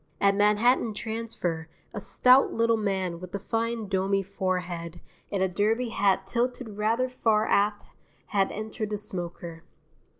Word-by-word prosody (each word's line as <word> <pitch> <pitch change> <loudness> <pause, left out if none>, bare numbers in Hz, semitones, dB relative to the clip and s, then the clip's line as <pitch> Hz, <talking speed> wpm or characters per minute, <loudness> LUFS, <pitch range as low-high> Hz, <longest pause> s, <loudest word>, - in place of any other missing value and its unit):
At 200 0 +4
Manhattan 210 +3 +3
Transfer 215 -8 -3 0.2
a 205 - -4
stout 255 +6 +5
little 230 0 +2
man 190 -5 -1
with 185 +1 -8
a - - -2
fine 225 +1 -2
domy 195 0 +1
forehead 180 -3 -3 0.3
and 195 -2 0
a - - +3
derby 215 +6 0
hat 195 -3 +1
tilted 245 +3 -2
rather 230 +4 +1
far 225 -4 +1
aft 205 0 +1 0.4
had 195 -1 +1
entered 215 0 -4
the 210 - -2
smoker. 175 -4 -6
205 Hz, 140 wpm, -27 LUFS, 190-225 Hz, 0.4 s, stout